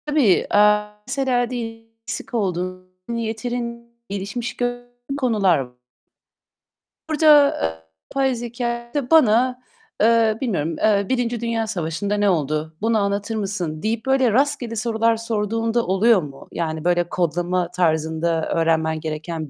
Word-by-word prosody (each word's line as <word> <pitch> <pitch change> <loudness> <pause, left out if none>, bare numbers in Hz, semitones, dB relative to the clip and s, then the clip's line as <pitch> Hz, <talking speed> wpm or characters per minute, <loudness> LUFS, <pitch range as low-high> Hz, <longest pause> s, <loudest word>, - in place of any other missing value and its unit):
Tabii, 290 - +3
eee, 210 0 +5 0.2
mesela 250 -3 0
diyelim 225 -2 -6 0.2
eksik 225 +3 -6
olduğun, 185 -3 -2 0.2
yeterin 235 +1 -4 0.2
gelişmiş 200 +5 -4
gördüğün 245 +1 -4
konular 200 - +2
v 125 0 -32 1.3
Burada, 300 -2 +6
eee, 80 0 -1 0.4
yapay 265 -2 +2
zekâ 235 0 -4
da 285 -2 -2
bana, 250 -4 +4 0.4
eee, 225 0 +4
bilmiyorum, 165 - -1
eee, 200 -2 +2
"Birinci 245 -2 -1
Dünya 230 -1 -1
Savaşı'nda 185 0 -2
ne 205 -1 +3
oldu? 155 -1 -1
Bunu 225 +1 +2
anlatır 200 +2 -1
mısın?" 190 -7 -3
deyip 225 +2 -1
böyle 265 -3 +3
rastgele 245 -1 0
sorular 230 0 +1
sorduğun 225 0 -1
da 235 0 +1
oluyor 195 +2 +4
mu? 140 -3 -10
Yani, 160 -2 -3
böyle, 175 0 +1
kodlama 175 +1 -1
tarzında 160 -1 0
öğrenmen 160 -1 +1
gereken 155 0 -5
220 Hz, 130 wpm, -22 LUFS, 175-240 Hz, 1.3 s, Burada